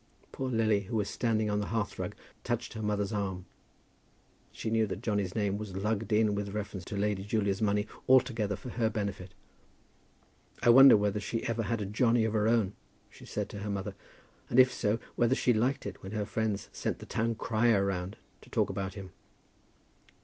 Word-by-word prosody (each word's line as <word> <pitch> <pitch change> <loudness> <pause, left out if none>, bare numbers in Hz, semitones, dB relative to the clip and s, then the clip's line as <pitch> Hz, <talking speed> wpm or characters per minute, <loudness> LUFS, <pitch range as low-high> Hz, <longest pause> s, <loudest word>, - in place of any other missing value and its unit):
Poor 130 -1 -3
Lily, 110 -3 +2
who 115 - -5
was 105 -2 0
standing 110 -3 0
on 105 0 0
the 105 - -2
hearth 110 -2 -2
rug, - - -4 0.3
touched 120 -1 -2
her 110 - -6
mother's 105 0 -1
arm. 95 -3 -3 1.1
She 110 - -4
knew 110 -1 +2
that 100 +2 -6
Johnny's 100 -5 -1
name 100 -2 0
was 105 -3 -6
lugged 105 +3 -2
in 105 0 +3
with 100 0 -3
reference 100 -3 -4
to 105 - -5
Lady 100 -1 0
Julia's 100 -1 0
money 105 -1 +2 0.2
altogether 120 -6 +3
for 125 - -9
her 115 -2 0
benefit. 100 -4 -4 1.3
"I - - +5
wonder 135 -1 +9
whether 105 0 0
she 115 +2 -3
ever 115 0 -1
had 115 0 -1
a - - -2
Johnny 115 +3 +2
of 110 - -1
her 105 -1 +2
own," 110 -4 +2 0.4
she - - -14
said - - -3
to 100 - -7
her 105 +1 -4
mother, 100 0 -3 0.6
"and, 120 - +3
if 130 0 +7
so, 110 -3 0 0.2
whether 120 +2 +3
she 125 - +2
liked 125 +5 0
it 100 -1 -6
when 95 +2 -8
her 105 -1 -1
friends 110 -1 -2
sent - - -2
the - - -10
town 115 +1 -1
crier 110 -2 +2
round 95 0 -3 0.2
to - - -17
talk - - +1
about 95 -1 -4
him." 95 -3 -8
105 Hz, 195 wpm, -30 LUFS, 100-115 Hz, 1.3 s, wonder